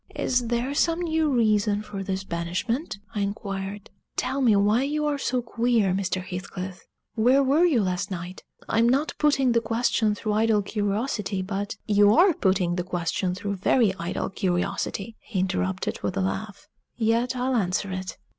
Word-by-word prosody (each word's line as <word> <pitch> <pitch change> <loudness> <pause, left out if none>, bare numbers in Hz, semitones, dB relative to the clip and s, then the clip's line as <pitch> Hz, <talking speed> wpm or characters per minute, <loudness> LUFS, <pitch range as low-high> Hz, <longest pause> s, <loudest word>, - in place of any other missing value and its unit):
"Is 245 -2 0
there 240 +4 -1
some 330 +3 +1
new 320 -2 +1
reason 215 -4 +2
for 200 -2 -6
this 190 0 -3
banishment?" 185 - -3 0.2
I 210 - -2
inquired. 200 0 -4 0.2
"Tell 270 +2 -1
me 230 -5 +5
why 205 +4 +3
you 300 +2 -1
are 290 -1 0
so 250 -2 -1
queer, 230 -4 +1
Mr. 185 -1 -1
Heathcliff. 185 0 -7 0.3
Where 250 +5 +4
were 290 +6 +4
you 270 -11 +3
last 185 +2 -1
night? 180 0 -6 0.3
I'm 230 +1 +3
not 275 +5 +1
putting 275 -4 +3
the 230 0 +3
question 225 -2 +1
through 210 0 -2
idle 215 -1 +2
curiosity, 205 -1 -2
but 200 +1 -3
" - - -48
"You 205 +1 +6
are 360 +1 +6
putting 185 - +1
the 180 - 0
question 180 +1 -2
through 200 +1 -3
very 205 +2 +3
idle 170 +3 -3
curiosity," 195 +3 -2
he 205 -5 -4
interrupted, 185 0 -2
with 185 - -2
a - - +1
laugh. 195 +2 -4 0.3
"Yet 235 +3 +1
I'll 255 +1 0
answer 195 -2 0
it. 185 0 -5
210 Hz, 170 wpm, -25 LUFS, 190-245 Hz, 0.3 s, You